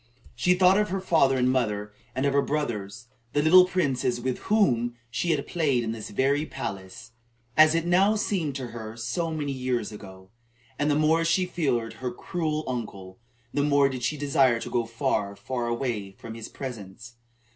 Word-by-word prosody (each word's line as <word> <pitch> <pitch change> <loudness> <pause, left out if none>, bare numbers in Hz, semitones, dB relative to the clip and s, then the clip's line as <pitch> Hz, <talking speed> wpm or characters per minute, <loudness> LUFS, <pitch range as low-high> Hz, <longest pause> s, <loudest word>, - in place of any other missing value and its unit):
She 180 0 +2
thought 185 +2 +5
of 210 - +1
her 195 - -1
father 155 -8 +3
and 125 0 +2
mother, 105 -5 -1 0.2
and 130 - 0
of 140 - +2
her 140 - +4
brothers, 120 -7 -3 0.3
the 145 - +2
little 180 +4 +8
princes 135 -9 0
with 125 +1 -2
whom 120 - +2 0.2
she 170 +6 -1
had 150 -4 +1
played 145 -8 +1
in 110 - -2
this 115 -1 -6
very 140 +6 +1
palace, 95 -5 -7 0.4
as 155 +2 +6
it 165 0 0
now 190 +5 +4
seemed 190 - -1
to 130 -3 -5
her, 110 -1 -8
so 120 +9 -2
many 150 -3 -3
years 125 -4 -2
ago. 95 -2 -12 0.5
And 145 +1 +1
the 145 - +3
more 155 +2 +3
she 165 +3 +2
feared 125 -11 -1
her 125 - -1
cruel 155 +4 -3
uncle, 100 -7 -6 0.3
the 145 - +1
more 140 -1 +4
did 130 -2 -5
she 150 +5 -1
desire 140 -4 +3
to - - -6
go 120 -1 +1
far, 105 -3 -1
far 120 +4 -4
away 120 -5 -2
from 115 - -8
his 115 -1 -8
presence. 115 -1 -8
130 Hz, 185 wpm, -26 LUFS, 115-155 Hz, 0.5 s, little